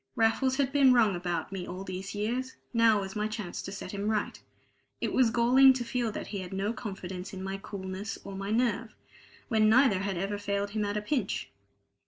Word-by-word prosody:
Raffles 255 +4 +2
had 275 -1 +1
been 275 -3 +6
wrong 220 -6 +4
about 175 -1 -3
me 185 -2 -5
all 185 +2 -6
these 190 +1 -6
years; 245 +5 -2 0.2
now 225 -3 +4
was 195 +2 -6
my 210 0 0
chance 210 -4 -5
to 195 - -7
set 200 - -6
him 200 0 -3
right. 215 -1 -1 0.6
It - - -2
was 255 -3 +4
galling 250 +3 +6
to 255 -1 -3
feel 235 -1 -1
that - - -5
he 200 - -5
had 185 0 -7
no 200 +3 -1
confidence 190 -4 -6
in 190 0 -6
my 195 0 -3
coolness 195 +1 -6
or 195 0 -7
my 195 +1 -4
nerve, 230 0 0 0.5
when 215 -3 +3
neither 240 -4 +5
had 195 -1 -2
ever 200 +3 -2
failed 200 0 -2
him 210 0 -1
at 205 +1 -2
a 210 - -2
pinch. 230 -3 -2
210 Hz, 210 wpm, -29 LUFS, 195-235 Hz, 0.6 s, been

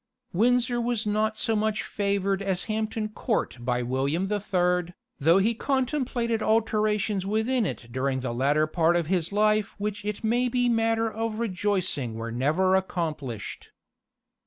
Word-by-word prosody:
Windsor 240 +4 +2
was 235 -2 -1
not 215 +1 0
so 225 - +1
much 215 0 0
favoured 200 -1 -1
as 190 -2 -1
Hampton 215 0 -2
Court 215 - -2
by 125 0 -1
William 140 +9 -1
the 210 0 0
Third, 180 -2 0 0.2
though 165 +6 +5
he 210 +4 +3
contemplated 250 -3 -1
alterations 215 -2 +1
within 220 +3 +1
it 120 - -6
during 130 +1 -1
the 125 -2 -3
latter 145 +5 +2
part 165 +2 +2
of 170 -2 +1
his 175 0 0
life 215 0 +2
which 205 0 -3
it 210 +2 -4
may 240 +3 +2
be 245 0 +1
matter 225 -1 +2
of 225 0 -3
rejoicing 185 - -1
were 115 +1 -5
never 155 +10 +2
accomplished. 155 - -3
205 Hz, 150 wpm, -26 LUFS, 170-225 Hz, 0.2 s, though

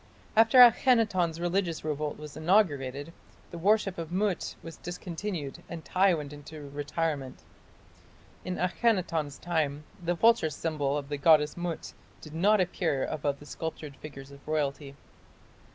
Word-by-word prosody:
After 225 +3 +5
Akhenaton's 225 -9 +5
religious 175 -1 -1
revolt 150 -1 -2
was 150 -1 -9
inaugurated, 155 -5 +1 0.4
the 170 - -7
worship 195 0 +2
of 165 0 -5
Mut 190 -1 -1
was 165 -1 -9
discontinued 175 -3 -5
and 165 -2 -7
Tiy 185 -1 +3
went 150 -2 -6
into 145 0 -10
retirement. 145 -1 -3 1.0
In 180 0 -3
Akhenaton's 180 - 0
time 150 -4 -1 0.2
the 175 +1 0
vulture 225 -2 +4
symbol 150 -2 -1
of 140 -1 -5
the 145 - -2
goddess 150 0 +5
Mut 175 -2 -4 0.3
did 155 - -11
not 200 +6 +3
appear 170 -6 0
above 145 -2 -2
the 145 - -14
sculptured 155 -2 -6
figures 135 -2 -10
of 140 - -12
royalty. 145 -2 -2
160 Hz, 135 wpm, -29 LUFS, 145-180 Hz, 1.0 s, After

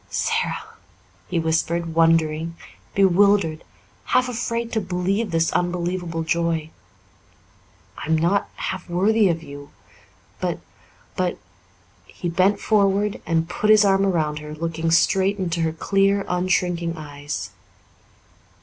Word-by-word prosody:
"Sara," - - -1 0.6
he 180 - -2
whispered, 165 +1 0
wondering, 165 0 +2 0.4
bewildered, 195 -3 +3 0.4
half 255 0 +2
afraid 235 -1 -3
to 220 - 0
believe 190 +4 -1
this 165 -1 +1
unbelievable 175 -1 -2
joy. 165 -1 -1 1.3
"I'm 160 0 0
not 175 +5 +1
half 185 -1 -5
worthy 200 +4 +3
of 165 -1 -1
you 145 -1 -10 0.7
but - - -1 0.6
but" 180 -1 -1 0.7
he 175 - -5
bent 190 +4 +2
forward 205 -1 +1
and 165 -1 +1
put 210 +4 -1
his 215 -1 +7
arm 195 0 +3
around 155 -6 0
her, 150 0 -8
looking 165 +1 -2
straight 190 +4 +3
into 175 -3 -2
her 160 -1 +1
clear, 195 +4 +1
unshrinking 180 -2 0
eyes. 145 -1 -6
175 Hz, 115 wpm, -22 LUFS, 165-195 Hz, 1.3 s, his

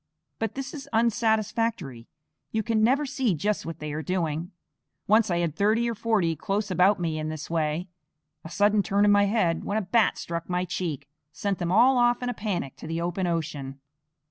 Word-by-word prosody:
But 225 -2 -2
this 270 0 -5
is 285 -3 -8
unsatisfactory; 220 - 0 0.4
you 220 0 0
can 225 -1 +1
never 270 +6 +3
see 260 -8 0
just 205 +6 -1
what 165 - -5
they 150 -1 -5
are 155 - -3
doing. 170 0 -2 0.5
Once 215 +1 +4
I 175 - +1
had 170 -3 -1
thirty 215 +5 +2
or 235 - -1
forty 205 -7 +1
close 200 +5 -2
about 185 +2 +4
me 160 -2 -2
in 155 0 -3
this 155 0 -6
way. 160 +2 -1 0.6
A 160 - -8
sudden 205 +4 +3
turn 200 +1 +2
of 205 - +5
my 205 0 +5
head, 195 -6 +1
when 205 - -1
a - - +1
bat 210 +4 +2
struck 170 +1 -5
my 180 0 0
cheek, 175 -6 -4 0.2
sent 200 +4 -2
them 175 -1 -1
all 245 +6 +5
off 240 0 +3
in 245 - -1
a - - -1
panic 195 - -3
to - - -9
the 165 +1 -2
open 175 +2 -1
ocean. 150 -5 -3
195 Hz, 200 wpm, -26 LUFS, 165-220 Hz, 0.6 s, of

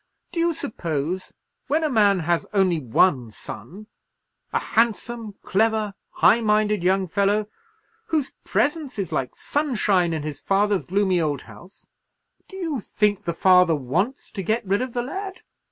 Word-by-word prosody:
Do 340 - -3
you 335 -1 +2
suppose, 170 - -3 0.4
when 305 +3 +1
a - - +3
man 205 -8 +3
has 170 +1 0
only 185 -4 +3
one 125 -1 +2
son, 190 - -10 0.7
a - - +1
handsome, 230 -1 -1
clever, 215 0 +1 0.2
high 235 - +4
minded 210 -3 +2
young 190 +1 +2
fellow, 200 +4 +1 0.6
whose 305 -4 -1
presence 295 -3 0
is 195 -5 -3
like 130 -2 -2
sunshine 215 - +1
in 160 -2 -2
his 150 -2 -5
father's 200 0 +1
gloomy 190 -2 +2
old 145 -4 -1
house—do 195 - -18
you 325 -8 -2
think 205 -1 0
the 170 - -1
father 180 -2 +5
wants 170 - -2
to 200 - -4
get 220 +4 -1
rid 200 +4 +1
of 255 -2 -4
the 240 - -1
lad? 380 +8 -6
205 Hz, 150 wpm, -23 LUFS, 180-235 Hz, 0.7 s, father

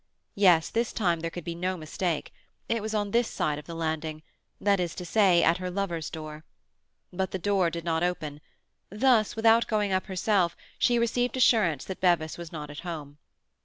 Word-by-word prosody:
Yes, 180 -5 +4
this 230 0 -1
time 175 -6 +1
there 165 +1 -3
could 175 0 -7
be 170 - -4
no 180 +2 -2
mistake; 160 0 -3 0.3
it 230 -1 0
was 220 +1 -3
on 205 -1 -1
this 235 +1 +2
side 150 -1 -1
of 150 - -13
the 170 - -6
landing—that 160 +5 -3
is 175 -2 -2
to 180 - -6
say, 185 -3 +4
at 170 +2 +3
her 185 0 -3
lover's 180 -4 -3
door. 155 -1 -8 0.7
But 190 +1 -1
the - - -3
door 190 -1 +1
did 170 0 -6
not 165 -1 0
open; 155 -5 -2 0.5
thus, 220 +1 +2
without 225 +1 +4
going 210 -2 0
up 185 +2 0
herself, 190 -2 +1 0.2
she 240 - +3
received 245 +2 0
assurance 190 - +3
that 190 - -7
Bevis 170 -4 +2
was 170 -2 -8
not 150 -2 -6
at 145 - -8
home. 150 -5 -7
180 Hz, 190 wpm, -27 LUFS, 160-205 Hz, 0.7 s, Yes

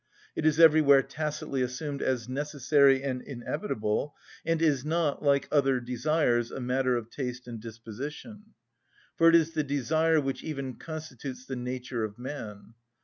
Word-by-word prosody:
It 155 - +1
is 155 0 +2
everywhere 150 -4 +7
tacitly 150 -2 -3
assumed 140 +3 -3
as 125 -3 -1
necessary 140 0 +3
and 130 -2 -2
inevitable, 135 - -3 0.3
and 165 -1 0
is 150 -5 +2
not, 155 -1 0
like 140 -1 +2
other 135 -3 +3
desires, 125 -1 +1
a - - -6
matter 130 0 +1
of 115 -1 -7
taste 125 -2 -5
and 115 -2 -6
disposition. 135 - -8 0.6
For 165 0 +6
it 165 - +6
is 165 -1 +4
the 155 -2 0
desire 155 +3 +2
which 135 -2 -3
even 135 -4 -5
constitutes 140 -5 -7
the 130 - -5
nature 125 -1 -4
of 105 -1 -5
man. 115 -5 -7
135 Hz, 150 wpm, -28 LUFS, 125-155 Hz, 0.6 s, everywhere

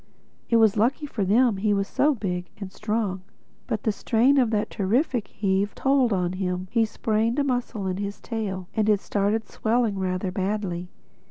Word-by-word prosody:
It 230 - +3
was 220 -2 +5
lucky 250 +8 +1
for 235 -8 -3
them 220 +3 +3
he's 200 0 +1
so 295 0 +2
big 180 -5 -3
and 195 -2 -7
strong. 210 -3 -2 0.5
But 215 - -2
the 220 - +2
strain 245 +6 +3
of 245 -3 +3
that 210 -2 -1
terrific 235 - 0
heave 200 0 -1
told 270 -3 +2
on 180 -2 0
him: 185 -1 -2
he 230 -2 +3
sprained 220 +2 0
a 290 - +2
muscle 245 -6 -2
in 185 -1 -2
his 200 0 -4
tail 195 -6 -4
and 215 -1 +2
it 210 -2 +4
started 205 +3 -1
swelling 220 -3 0
rather 185 0 -1
badly. 185 -2 -2
210 Hz, 175 wpm, -25 LUFS, 190-230 Hz, 0.5 s, was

